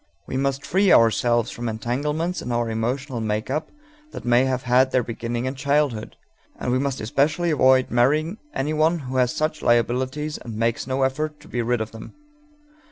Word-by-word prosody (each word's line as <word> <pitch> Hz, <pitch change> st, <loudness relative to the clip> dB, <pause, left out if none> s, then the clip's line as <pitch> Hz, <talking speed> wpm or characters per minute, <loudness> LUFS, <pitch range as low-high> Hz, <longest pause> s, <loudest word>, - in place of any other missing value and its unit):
We -, -, -5 dB
must 135 Hz, +1 st, -1 dB
free 195 Hz, +1 st, +3 dB
ourselves 115 Hz, +1 st, +4 dB
from 120 Hz, 0 st, -4 dB
entanglements 150 Hz, +10 st, -2 dB
in 125 Hz, -, -5 dB
our 120 Hz, -1 st, 0 dB
emotional 120 Hz, +3 st, -2 dB
make 110 Hz, +2 st, -2 dB
up 155 Hz, +3 st, -2 dB, 0.4 s
that -, -, -8 dB
may 120 Hz, +2 st, +4 dB
have 130 Hz, -1 st, -1 dB
had 125 Hz, +1 st, +4 dB
their 130 Hz, -1 st, +1 dB
beginning 120 Hz, +1 st, -4 dB
in 130 Hz, -, -2 dB
childhood, 140 Hz, -4 st, 0 dB, 0.4 s
and 125 Hz, -, -2 dB
we 130 Hz, -, +2 dB
must 135 Hz, -1 st, -2 dB
especially 150 Hz, +8 st, +1 dB
avoid 130 Hz, -3 st, +4 dB
marrying 150 Hz, -, +2 dB
anyone 155 Hz, -, +1 dB
who 130 Hz, -4 st, -5 dB
has 125 Hz, -1 st, +3 dB
such 155 Hz, 0 st, -2 dB
liabilities 130 Hz, +6 st, 0 dB
and 115 Hz, -2 st, -8 dB
makes 115 Hz, +2 st, -1 dB
no 135 Hz, 0 st, 0 dB
effort 150 Hz, +3 st, -1 dB
to -, -, -15 dB
be 120 Hz, -, -2 dB
rid 120 Hz, 0 st, 0 dB
of 110 Hz, -, -4 dB
them. 110 Hz, 0 st, -11 dB
130 Hz, 180 wpm, -23 LUFS, 120-150 Hz, 0.4 s, ourselves